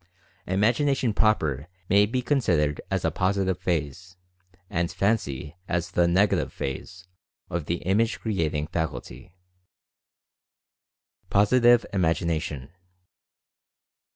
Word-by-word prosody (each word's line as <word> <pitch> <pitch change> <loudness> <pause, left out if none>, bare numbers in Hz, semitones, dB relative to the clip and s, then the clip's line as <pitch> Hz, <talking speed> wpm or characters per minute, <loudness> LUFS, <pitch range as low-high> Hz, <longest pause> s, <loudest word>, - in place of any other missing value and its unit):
"Imagination 120 +5 +1
proper" 80 - +1 0.2
may 100 +3 +4
be 125 +3 -2
consid 125 - +2
ered 75 -1 0
as - - -1
a - - +1
Positive 95 -1 0
phase, 85 +2 -3 0.5
and 85 -3 -1
"Fancy" 75 -8 -1
as 90 +1 -2
the 85 -1 +3
Nega 95 +4 +3
tive - - -4
phase, 90 +7 -6 0.5
of 85 -3 -2
the 85 - -2
Image 100 +1 +1
creating 80 -9 -1
faculty. 85 +2 -5 1.9
POSITIVE 120 +4 +4
IMAGINATION. 80 -6 -1
90 Hz, 100 wpm, -25 LUFS, 80-105 Hz, 1.9 s, may